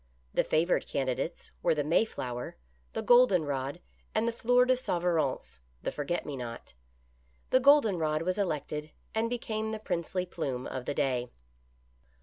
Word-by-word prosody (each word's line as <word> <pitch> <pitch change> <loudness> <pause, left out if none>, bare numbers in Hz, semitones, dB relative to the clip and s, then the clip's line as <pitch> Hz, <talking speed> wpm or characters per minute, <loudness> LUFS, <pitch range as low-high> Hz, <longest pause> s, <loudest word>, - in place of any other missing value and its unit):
The - - +3
favored 165 +3 +1
candidates 135 +4 -2
were 165 -2 +3
the 150 - 0
Mayflower, 130 - -1 0.4
the - - -2
golden 240 -9 +6
rod, 140 +2 -3 0.4
and 220 +2 +2
the - - +2
fleur 245 +2 +3
de 255 - +4
souverance 170 - -1 0.2
(the - - -1
forget 150 +4 -2
me 145 - -4
not). 120 - -7 0.8
The 255 - +6
golden 260 - +5
rod 155 0 0
was 185 +3 -1
elected 150 -4 -2 0.2
and 225 +1 +1
became 220 -2 -2
the 220 - -3
princely 180 -2 -2
plume 135 -8 -3
of 130 -1 -5
the 145 - -2
day. 125 -4 0
170 Hz, 150 wpm, -30 LUFS, 140-220 Hz, 0.8 s, golden